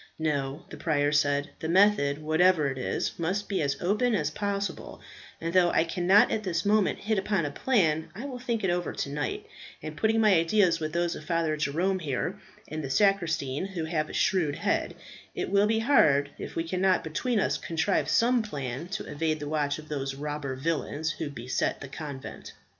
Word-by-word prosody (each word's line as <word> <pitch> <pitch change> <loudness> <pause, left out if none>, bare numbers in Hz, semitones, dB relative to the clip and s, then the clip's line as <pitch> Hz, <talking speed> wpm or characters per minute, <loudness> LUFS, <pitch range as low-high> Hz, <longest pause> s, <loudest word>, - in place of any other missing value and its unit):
"No," 145 0 -2
the - - -8
prior 145 -3 +1
said, 145 -1 +1
"the 160 - -4
method, 185 -6 +4
whatever 160 0 +3
it 130 - -6
is, 130 - -2
must 190 +5 -1
be 195 - -1
as 140 -2 -1
open 215 +6 +1
as 150 -5 0
possible; 200 0 -3 0.4
and 165 +1 -3
though 180 -2 +5
I 160 - +3
cannot 180 +4 +4
at 220 - 0
this 180 -4 -2
moment 210 -1 +3
hit 215 -1 0
upon 190 -4 0
a 145 - -3
plan, 160 - +1
I 235 +7 -6
will 260 -3 -6
think 235 -3 -2
it 190 - +2
over 175 0 -2
to - - -3
night, 400 - -3 0.3
and - - -7
putting 225 0 +2
my 215 -2 +5
ideas 170 0 +3
with 155 -1 -4
those 170 0 0
of - - -9
Father 165 -3 0
Jerome 170 +6 0
here, 165 +5 -3 0.3
and 155 0 -5
the 135 - -4
sacristan, 165 -4 +1
who 180 -5 -4
has 155 -2 -1
a - - -8
shrewd 160 -7 +1
head, - - -1 0.4
it - - -3
will 200 +1 +4
be 220 +1 +2
hard 150 - +4
if - - -7
we 165 - 0
cannot 185 +2 +1
between 215 +9 -1
us - - 0
contrive 165 +3 0
some 240 +1 +3
plan 140 - -5
to 190 - -5
evade 155 +1 -1
the 145 - -5
watch 145 -1 0
of 155 0 -11
those 135 -2 -3
robber 145 -1 -4
villains 160 +2 -2
who 155 - -4
beset 125 -2 -2
the 140 - -7
convent." 140 -1 -8
165 Hz, 195 wpm, -28 LUFS, 150-195 Hz, 0.4 s, though